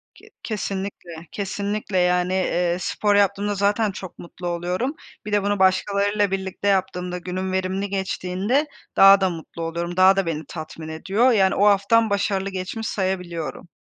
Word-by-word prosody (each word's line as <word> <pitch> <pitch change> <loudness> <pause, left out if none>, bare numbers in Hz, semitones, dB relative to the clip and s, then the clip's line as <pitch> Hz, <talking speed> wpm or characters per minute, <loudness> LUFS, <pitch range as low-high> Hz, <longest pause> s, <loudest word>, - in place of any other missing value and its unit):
Ke - - -17
kesinlikle, 190 -5 -5
kesinlikle. 205 0 -3
Yani, 180 0 +2
eee, 180 -2 +1
spor 205 +3 0
yaptığımda 205 +1 +2
zaten 205 +2 +1
çok 190 -2 -9
mutlu 175 +1 -8
oluyorum. 180 - -2 0.3
Bir 210 - -5
de 205 -1 +2
bunu 205 0 0
başkalarıyla 200 +2 +2
birlikte 190 +1 -3
yaptığımda 180 -2 0
günüm 185 +1 -4
verimli 190 +1 -1
geçtiğinde 195 +7 -1 0.3
daha 195 0 +8
da 190 - +3
mutlu 170 0 -8
oluyorum 170 +2 -3
daha 190 +1 +7
da 195 -1 +1
beni 160 -2 -3
tatmin 155 -1 -8
ediyor. 195 +10 +2
Yani, 195 -4 +3
o 205 - +3
haftam 210 +3 +4
başarılı 200 -1 0
geçmiş 195 +4 -4
sayabiliyorum. 180 -4 -3
190 Hz, 150 wpm, -23 LUFS, 180-205 Hz, 0.3 s, daha